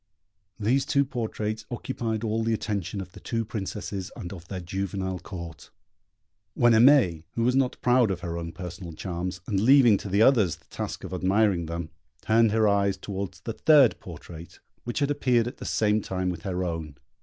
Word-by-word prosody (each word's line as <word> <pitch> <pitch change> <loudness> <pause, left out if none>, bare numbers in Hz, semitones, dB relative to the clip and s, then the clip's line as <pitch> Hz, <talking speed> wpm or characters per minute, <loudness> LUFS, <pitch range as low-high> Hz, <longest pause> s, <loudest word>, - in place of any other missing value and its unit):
These 130 +6 +1
two 140 -1 +3
portraits 110 -3 -4
occupied 115 -2 -3
all 110 0 0
the 115 0 +1
attention 100 -2 -3
of 90 -1 -9
the - - -12
two 115 -1 -2
Princesses 100 -2 -5
and 100 -5 -7
of 85 -2 -11
their 95 -1 -5
juvenile 95 +1 -3
Court, 85 -3 -9 0.9
when 120 -1 +5
Aimée, 110 - +5
who 115 - -1
was 125 +2 +2
not 135 -2 +1
proud 125 -2 +4
of 90 -2 -3
her 85 -1 -4
own 85 0 -4
personal 90 -1 -8
charms, 90 +1 -4
and 100 -3 0
leaving 120 -1 +6
to 100 - -7
the 100 +3 +4
others 110 - +4
the - - -27
task - - -6
of - - -7
admiring 95 -1 +2
them, 85 -1 -5 0.3
turned 115 0 +4
her 110 0 +3
eyes 100 -1 +2
towards 95 -2 -6
the 115 - -4
third 145 -2 +5
portrait, 85 -1 -11 0.3
which 120 - -4
had 140 0 +2
appeared 125 -5 +2
at 125 - -7
the - - -8
same 105 0 +1
time 95 -1 -2
with 85 -2 -7
her 90 0 -2
own. 80 -4 -4
100 Hz, 190 wpm, -26 LUFS, 90-115 Hz, 0.9 s, leaving